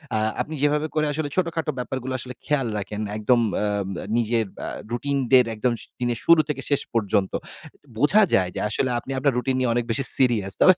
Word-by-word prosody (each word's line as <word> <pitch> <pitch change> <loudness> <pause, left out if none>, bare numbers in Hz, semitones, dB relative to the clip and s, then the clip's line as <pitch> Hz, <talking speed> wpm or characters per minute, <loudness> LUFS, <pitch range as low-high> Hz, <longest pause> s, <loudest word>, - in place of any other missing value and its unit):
আ - - +2 0.2
আপনি 155 - -5
যেভাবে 150 +1 +2
করে 155 0 +2
আসলে 145 0 -2
ছোটখাটো 165 -3 -1
ব্যাপারগুলো 130 +1 -4
আসলে 125 +1 -5
খেয়াল 140 -4 +1
রাখেন। 105 +1 -5 0.2
একদম 120 +3 +3
উম 115 - +1
আ - - +1 0.5
নিজের 115 -1 +1 0.2
আ - - -4 0.2
রুটিন 140 +4 -1
দের 125 -2 +7
একদম 120 +3 0 0.3
দিনের 120 -2 -1
শুরু 170 -1 +7
থেকে 135 -2 -2
শেষ 140 - +2
পর্যন্ত। 100 -3 +1 0.7
বোঝা 175 - +5
যায় 90 -1 +3
যে - - -3
আসলে 130 +4 0
আপনি 135 - -9
আপনার 140 -1 +2
রুটিন 130 +1 0
নিয়ে 125 -2 +1
অনেক 120 0 0
বেশি 135 +4 +3
সিরিয়াস। 115 -7 +2
তবে 185 - +7
130 Hz, 195 wpm, -23 LUFS, 115-145 Hz, 0.7 s, দের